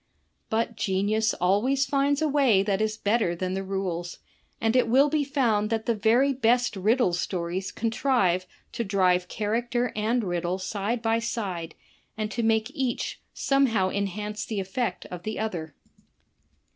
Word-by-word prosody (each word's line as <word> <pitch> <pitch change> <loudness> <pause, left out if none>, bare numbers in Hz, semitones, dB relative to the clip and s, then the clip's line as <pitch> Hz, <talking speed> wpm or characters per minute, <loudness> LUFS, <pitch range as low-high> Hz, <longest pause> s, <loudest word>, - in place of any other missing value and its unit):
But 230 +1 0
genius 210 +3 +1
always 230 +10 +2
finds 280 +2 +1
a - - +3
way 270 -9 +4
that 200 0 0
is 215 0 0
better 210 -5 +1
than 185 +1 -3
the 190 - -2
rules, 185 -3 -3 0.4
and 225 +1 +1
it 255 - +4
wUl 270 +5 +5
be 305 -2 +2
found 240 -7 +1
that 225 -1 -1
the 235 - +2
very 235 +6 +3
best 245 -2 +2
riddle 210 0 +2
stories 175 +1 -2
contrive 225 -6 +1 0.2
to 235 - -2
drive 185 -3 +2
character 235 +5 -1
and 225 +3 +1
riddle 175 -1 -1
side 205 +5 -3
by 225 0 +2
side, 190 -8 -4 0.4
and 215 0 -2
to 235 - -2
make 225 +1 +1
each 255 -3 -2 0.2
somehow 230 -9 +2
enhance 210 +2 -3
the 215 -3 -3
effect 195 +6 -3
of 180 -1 -6
the 215 +4 -4
other. 170 -9 -4
215 Hz, 155 wpm, -26 LUFS, 190-240 Hz, 0.4 s, wUl